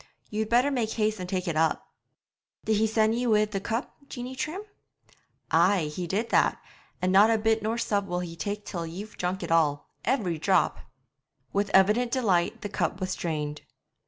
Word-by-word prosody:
You'd 215 0 -2
better 245 +4 +3
make 235 -5 -1
haste 215 -2 0
and 180 0 -5
take 185 -1 -2
it 165 - -1
up.' 160 0 +1 0.8
'Did 220 -1 +2
he 220 +1 +3
send 220 0 +2
ye 245 +1 -1
wi' 215 -2 +4
the 210 -2 -4
cup, 225 +6 -3
Jeanie 250 +1 -6
Trim?' 325 +9 -4 0.9
'Ay, 170 -7 +3
he 180 -1 -3
did 210 +7 -1
that; - - +3 0.4
and 185 - +2
not 200 +3 +6
a 225 - +3
bit 220 +1 +1
nor 220 +2 -1
sup 205 -4 0
will 180 -2 -2
he 170 -2 -6
tak 205 +5 -4
till 170 -3 -4
ye've 200 +6 -8
drunk 180 +1 -2
it - - -5
all, 150 -3 +2
every 185 - 0
drop.' 190 +4 +2 0.7
With 200 0 +1
evident 210 +6 +4
delight 215 -3 +1
the 210 - -3
cup 190 -2 -1
was 185 -1 -2
drained. 150 -4 -3
205 Hz, 190 wpm, -27 LUFS, 180-225 Hz, 0.9 s, not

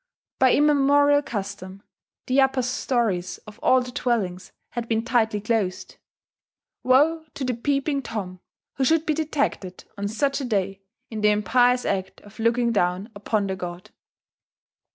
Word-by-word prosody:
By 260 -1 +5
immemorial 285 0 +4
custom 200 -5 -6 0.4
the 260 +2 +3
upper 265 -1 +2
stories 235 -7 -1
of 210 0 -13
all 260 0 +4
the 250 0 -6
dwellings 195 -8 -2 0.2
had 235 -1 -4
been 225 0 0
tightly 225 -3 +1
closed: 210 -3 -2 0.8
woe 300 +6 +3
to 275 - -4
the 255 -1 0
Peeping 275 +3 -1
Tom 195 -7 -6 0.4
who 270 - +1
should 320 +3 +3
be 310 - +1
detected, 285 - -2 0.2
on 200 - -1
such 275 +6 -1
a - - -3
day, 195 -4 -1 0.3
in 220 -1 -4
the 210 - +5
impious 245 +5 +3
act 190 -1 -2
of 205 +1 -17
looking 235 +1 +2
down 185 +1 0
upon 205 0 -1
the 190 -1 -2
god!... 175 -1 -7
230 Hz, 150 wpm, -24 LUFS, 200-265 Hz, 0.8 s, By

